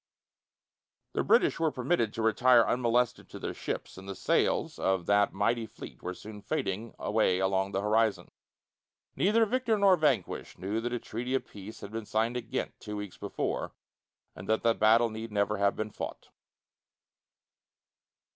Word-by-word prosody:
The - - +1
British 380 - +3
were 165 -1 +3
permitted 125 -4 0
to 115 - -2
retire 120 +2 +5
unmolested 120 0 +1
to - - -8
their - - -4
ships, - - -5
and 95 +1 -10
the 100 - -4
sails - - +1
of 95 -2 +1
that 100 0 +3
mighty 115 +3 0
fleet 110 - -11
were 90 +1 -4
soon 105 +1 -10
fading 105 +2 -3
away 105 -4 +2
along 95 +1 +1
the 95 - -1
horizon. 105 -3 +1 0.8
Neither 220 +4 +3
victor 235 -1 +1
nor 200 -2 +6
vanquished 155 -2 0
knew 105 +4 -2
that 120 +1 -3
a 120 - 0
treaty 125 +3 -3
of 135 - -1
peace 105 +2 -10
had 100 - -8
been 110 -1 -5
signed 115 +3 0
at 115 -2 -5
Ghent 130 - -2
two 105 -1 -6
weeks 105 -3 -7
before, - - -3 0.6
and - - -10
that 110 - +2
the 115 - +4
battle 115 +2 +4
need 110 +1 -6
never 105 0 +1
have 100 0 +2
been 110 0 -3
fought. - - -7
110 Hz, 165 wpm, -30 LUFS, 100-120 Hz, 0.8 s, nor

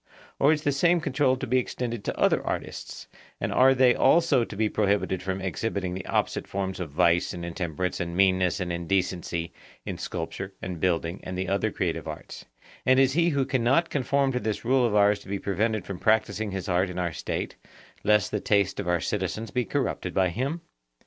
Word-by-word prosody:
Or 140 - +5
is 155 -1 0
the 145 - +2
same 170 +5 +3
control 140 -4 +1
to 130 - -4
be 130 +1 +2
extended 120 -3 -4
to - - -3
other - - +3
artists, - - -5 0.3
and - - -2
are 135 +1 +5
they 130 -1 +5
also 160 -6 +4
to 110 - -7
be 110 +2 +1
prohibited 100 -3 0
from 95 0 -3
exhibiting 95 -1 -2
the 95 0 -6
opposite - - -1
forms 95 -1 -3
of 90 -4 -4
vice 85 +5 +2
and 85 -1 -5
intemperance 85 0 -3
and 85 -1 -3
meanness 95 -2 +3
and 90 -2 -2
indecency 85 -1 -2 0.3
in - - -5
sculpture 95 +4 -5
and 90 -2 -5
building 85 0 0
and 90 0 -6
the 95 0 -2
other 100 +1 +1
creative - - -2
arts; - - -8 0.4
and 130 +1 +4
is 135 -1 +4
he 170 +2 +3
who 140 -4 +1
cannot 130 +7 +2
conform 140 0 +1
to 125 - -1
this 110 -1 -3
rule 130 0 +3
of 105 - -1
ours 105 0 +4
to - - -16
be 100 - -1
prevented 105 +2 -1
from 95 -3 -6
practising 110 -1 +1
his 95 -1 -4
art 90 +1 +1
in 90 - -7
our 85 -2 -1
State, - - -4 0.5
lest 105 -1 +3
the 105 - 0
taste 100 -2 +1
of 100 - -3
our 90 -1 +2
citizens 105 +3 -3
be 125 -1 0
corrupted 130 -9 -2
by 95 -1 +3
him? 135 - -2
100 Hz, 200 wpm, -26 LUFS, 90-125 Hz, 0.5 s, Or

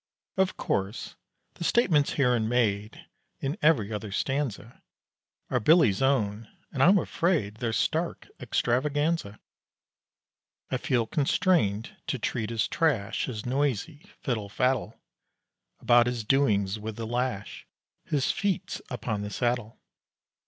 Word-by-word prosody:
Of 190 -1 +1
course, 100 +4 -2 0.4
the - - -7
statements 165 -8 +3
herein 125 -5 +2
made 110 -3 0 0.3
In 140 +3 -2
every 115 -10 +3
other 105 -1 -5
stanza 130 -1 -3 0.7
Are - - +2
Billy's 150 - +4
own; 115 -5 +1 0.2
and 135 - -2
I'm 185 +8 +7
afraid 165 - 0
They're 115 -1 -2
stark 165 +8 -1
extravaganza. 140 +1 0 1.3
I - - +1
feel 120 -3 0
constrained 135 - +1
to - - -1
treat 110 -1 -2
as 115 -3 0
trash 125 -11 0
His 110 -5 -6
noisy 140 +3 -1 0.2
fiddle 110 -6 -2
faddle 125 0 0 0.8
About 120 0 +5
his 120 -2 -2
doings 105 -5 +2
with 110 0 -5
the 115 - -5
lash, 120 -3 -3 0.4
His 140 -3 0
feats 200 -3 -2
upon 115 -4 -3
the 105 - -4
saddle. 120 0 -2
120 Hz, 120 wpm, -27 LUFS, 110-145 Hz, 1.3 s, I'm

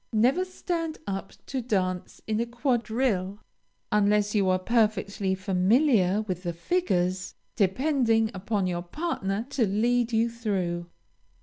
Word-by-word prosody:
Never 255 +12 +3
stand 335 -3 -3
up 195 -1 -4
to 265 -2 -3
dance 185 -6 -2
in 215 0 -1
a 235 - 0
quadrille, 235 -5 0 0.5
unless 210 0 +3
you 200 -3 +2
are 185 - +3
perfectly 200 -2 +1
familiar 195 +2 +3
with 185 -4 -4
the 175 -2 -3
figures, 185 - -1 0.2
depending 225 +1 +2
upon 200 +1 -1
your 175 -1 -1
partner 200 - -3
to 245 -6 +2
lead 235 +4 +1
you 225 +1 +3
through. 190 -7 -2
210 Hz, 125 wpm, -27 LUFS, 190-240 Hz, 0.5 s, Never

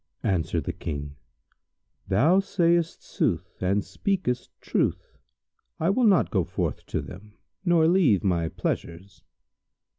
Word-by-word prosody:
Answered 90 -5 0
the - - -3
King, 75 -2 -5 0.9
"Thou 150 - +4
sayst 170 -4 +1
sooth, - - -2
and 95 +2 +1
speakest 125 - -2
truth. - - -1 0.6
I 165 +4 +2
will 240 +3 +3
not 195 -4 +4
go 95 -5 +2
forth - - -3
to - - -2
them 105 +4 -11 0.3
nor 170 -3 +4
leave 165 - +4
my 85 -4 +1
pleasures." 85 +2 -4
105 Hz, 120 wpm, -26 LUFS, -, 0.9 s, Thou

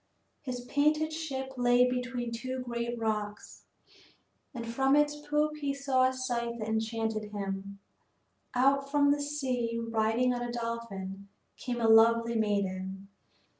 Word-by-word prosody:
His 250 -2 -4
painted 300 +5 +1
ship 270 -5 -4
lay 245 0 +5
between 250 -1 -2
two 255 +3 -4
great 235 -1 -3
rocks, 210 -2 -3 0.9
and 235 -3 -6
from 270 +4 +2
its 295 0 +3
poop 300 +1 0
he 285 -2 -2
saw 270 -2 +2
a 260 - +3
sight 240 -2 -2
that 215 -2 -4
enchanted 220 0 -1
him. 200 -1 -5 0.8
Out 275 +2 +3
from 285 0 +4
the 290 0 +1
sea, 255 -5 -1
riding 230 +2 +1
on 245 - -3
a 240 0 -3
dolphin, 225 -5 -5 0.3
came 245 -2 -4
a 230 - +2
lovely 230 +1 +6
maiden. 195 -3 -1
240 Hz, 135 wpm, -30 LUFS, 225-265 Hz, 0.9 s, lovely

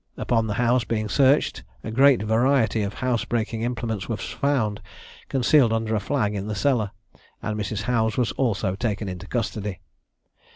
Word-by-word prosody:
Upon 115 -2 +1
the 105 - -2
house 120 0 +2
being 110 -2 -2
searched 140 - +3 0.2
a - - -5
great 135 0 +5
variety 115 0 +2
of 100 0 -3
house 125 -3 0
breaking 115 -2 -2
implements 115 -4 -3
was 115 - -3
found, 125 -8 0 0.5
concealed 130 -1 +4
under 115 0 0
a 110 - +2
flag 105 -1 -1
in 100 0 -4
the 105 - -3
cellar, 115 -3 +1 0.5
and 105 - -2
Mrs. 105 0 -3
Howes 110 -2 0
was 125 -3 +1
also 105 -7 0
taken 105 0 -2
into 90 -2 -6
custody. 105 -4 -3
110 Hz, 165 wpm, -24 LUFS, 105-125 Hz, 0.5 s, great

